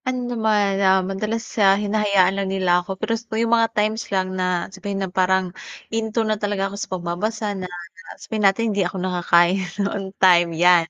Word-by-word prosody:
Ano 255 -1 -2
naman, 210 -3 +1
ah, 190 -1 +3
madalas, 215 +4 -3 0.2
ah, 195 0 +5
hinahayaan 200 -2 +2
lang 195 -1 -2
nila 185 -2 +2
ako 190 +2 -6
pero 215 +3 -2
sa 230 - -2
tuwing 220 +1 0
yung 230 - +1
mga 230 -1 +3
times 215 +2 0
lang 185 -1 -1
na 180 -2 -1
sabihin 200 0 -5
na 180 - -10
parang 185 -1 +1 0.4
'into' 225 0 -1
na 215 -1 -1
talaga 205 -2 -1
ako - - -6
sa - - -5
pagbabasa 185 +5 -3
na 185 -2 -6 0.5
sabihin 220 -1 -5
natin 195 +3 +3
hindi 200 - 0
ako 180 +1 -2
nakakain 180 0 +2 0.3
'on 195 -2 -4
time' 175 -3 +4
yan. 175 -1 +4
195 Hz, 195 wpm, -21 LUFS, 185-215 Hz, 0.5 s, ah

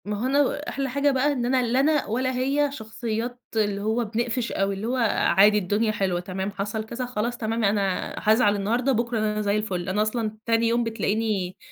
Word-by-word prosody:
ما 210 0 -3
هو - - -1
أنا 285 +2 +1
أحلى 275 -1 -2
حاجة 280 +2 +2
بقى 270 +2 +2
إن 250 -4 -1
أنا 255 +1 +2
لا 245 +2 +1
أنا 295 +1 +2
ولا 255 +4 -1
هي 280 +3 +1
شخصيات 230 0 -4 0.2
اللي 205 -2 0
هو 220 +3 0
بنقفش 235 +2 -2
أوي، 195 0 0
اللي 205 +4 -4
هو 250 - 0 0.4
عادي، 210 +2 +7
الدنيا 210 +3 +1
حلوة، 190 -4 -1
تمام، 190 +2 -4
حصل 205 +2 -3
كذا 235 +3 -4
خلاص 240 0 -2
تمام 225 0 -2
أنا 200 -2 0
حازعل 215 -1 +3
النهارده، 235 +7 0
بُكرة 235 -1 0
أنا 215 0 0
زي 205 0 +1
الفُل، 190 -4 -3
أنا 200 +3 +1
أصلًا 215 0 -1
تاني 230 0 +2
يوم 235 +1 +2
بتلاقيني 215 -4 -1
225 Hz, 200 wpm, -25 LUFS, 205-245 Hz, 0.4 s, عادي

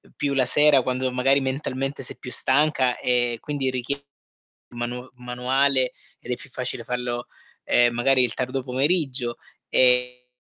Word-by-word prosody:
più 145 -1 -1
la 135 -2 +2
sera 150 -1 +5
quando 130 +1 -1
magari 135 +2 +3
mentalmente 135 0 -3
sei - - -9
più 125 - -9
stanca 130 -2 +2
e 120 -1 +1
quindi 145 -3 -2
richie 135 +3 -3 0.6
manu 120 +1 -5
manuale 125 +2 +1 0.3
ed 125 - -6
è - - -1
più 130 - -14
facile 125 -2 -4
farlo, 120 0 -3 0.4
ehm, 120 -1 +3
magari 130 +2 +4
il 120 - -2
tardo 130 +1 -2
pomeriggio 135 -2 0 0.3
e 125 0 +3
130 Hz, 145 wpm, -24 LUFS, 125-135 Hz, 0.6 s, sera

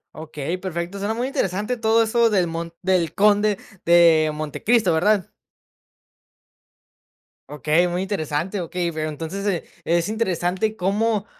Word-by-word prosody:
Okey, 155 +2 -5
perfecto, 180 +1 -4
suena 210 +3 -2
muy 240 +2 -2
interesante 210 -2 -1
todo 225 0 +3
eso 230 +1 +2
del 195 -5 +2
mon 165 0 -5
del 180 -4 +1
conde 210 0 +3 0.3
de 165 -2 +5
Montecristo, 170 - 0
¿verdad? 200 +3 +1 2.2
Okey, 155 +4 +1
muy 175 +2 -2
interesante, 185 0 -2
okey, 170 0 -3
pero 155 0 -3
entonces, 165 +6 -5
eh, 190 -5 0 0.2
es 170 +1 +1
interesante 205 -1 -1
cómo, 210 +2 0
185 Hz, 125 wpm, -22 LUFS, 165-210 Hz, 2.2 s, de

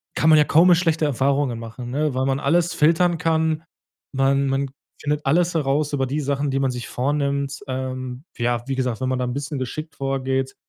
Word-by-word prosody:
kann 160 - +3
man 155 - +7
ja 150 - +5
kaum 165 +4 +5
mehr 175 - +7
schlechte 165 -2 +1
Erfahrungen 135 -2 +1
machen, 120 +2 -7
ne, 150 +1 0
weil 130 +1 0
man 135 0 0
alles 175 +3 +2
filtern 170 +2 +3
kann. 160 -2 +1 0.5
Man 135 +1 +2
man 135 0 0 0.3
findet 150 0 -1
alles 175 +5 +3
heraus 145 -1 0
über 135 -2 0
die 150 +3 -2
Sachen, 140 0 -1
die 135 0 0
man 135 -1 +1
sich 125 -1 -6
vornimmt. 140 +1 -1
Ähm, 130 0 -4
ja, 120 0 0
wie 135 - -1
gesagt, 125 -3 -2
wenn 130 - 0
man 130 -1 -1
da 125 - 0
'n 125 - -3
bisschen 140 0 -4
geschickt 155 +5 -5
vorgeht 135 -1 -1
140 Hz, 210 wpm, -22 LUFS, 130-155 Hz, 0.5 s, man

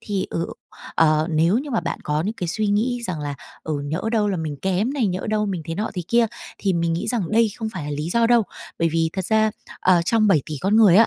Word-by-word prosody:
thì, 195 -2 -2
ờ, 165 - -1 0.5
ờ, 155 -1 +4
nếu 165 +7 +3
như 285 +2 -5
mà 230 - +1
bạn - - -3
có 150 0 0
những 210 +5 -2
cái 180 - -4
suy 215 +5 -1
nghĩ 235 +4 +1
rằng 175 -4 -3
là 145 -1 -3 0.3
"Ừ, 150 -2 -2
nhỡ 155 +5 -2
đâu 210 -2 +2
là 195 - 0
mình 155 -3 -3
kém 190 +7 +1
này, 260 -7 +1
nhỡ 185 0 -2
đâu 215 -1 +1
mình 185 -5 -3
thế 165 +1 -4
nọ 210 +4 -2
thế 180 - -2
kia," 235 0 +4 0.3
thì 195 - +1
mình 170 -1 +1
nghĩ 165 - -2
rằng 220 -9 -1
đây 225 0 +4
không 220 -2 -3
phải 180 -7 -5
là 150 - -4
lý 150 +3 -3
do 230 +4 +3
đâu, 235 -1 +5 0.4
bởi 165 - +2
vì 165 0 +1
thật 190 -3 -3
ra, 220 +1 +3 0.3
ờ, 180 -2 +4
trong 220 +2 +3
7,000,000,000 155 -5 +2
con 200 +6 +2
người 205 -6 +7
á, 225 +2 +7
190 Hz, 265 wpm, -22 LUFS, 165-220 Hz, 0.5 s, người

